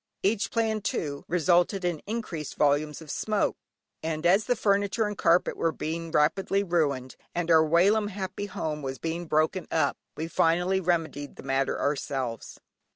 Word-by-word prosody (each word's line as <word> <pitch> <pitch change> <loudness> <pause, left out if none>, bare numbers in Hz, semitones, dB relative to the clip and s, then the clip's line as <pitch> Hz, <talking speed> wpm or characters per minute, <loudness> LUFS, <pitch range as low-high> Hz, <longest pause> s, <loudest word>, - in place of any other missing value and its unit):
Each 205 +2 +1
plan 220 -2 0
too, 145 -8 -3
resulted 175 +2 +2
in 175 -4 -1
increased 200 - -4
volumes 150 +2 +1
of 150 - -8
smoke, 215 -2 0 0.5
and 160 0 -3
as 195 +5 +4
the 245 - +2
furniture 205 +1 +1
and 210 0 -3
carpet 170 -1 +3
were 165 - +1
being 165 +2 -4
rapidly 195 +6 +2
ruined, 145 -8 0 0.2
and 170 -1 0
our 160 -1 +7
whilom 190 +7 +3
happy 195 0 -5
home 155 -5 -4
was 135 -1 -4
being 165 +1 -4
broken 155 +4 +1
up, 160 - +1 0.2
we 160 - -3
finally 175 +3 +2
remedied 165 -5 -1
the - - -11
matter 135 0 0
ourselves. 135 -5 -3
170 Hz, 155 wpm, -27 LUFS, 150-195 Hz, 0.5 s, our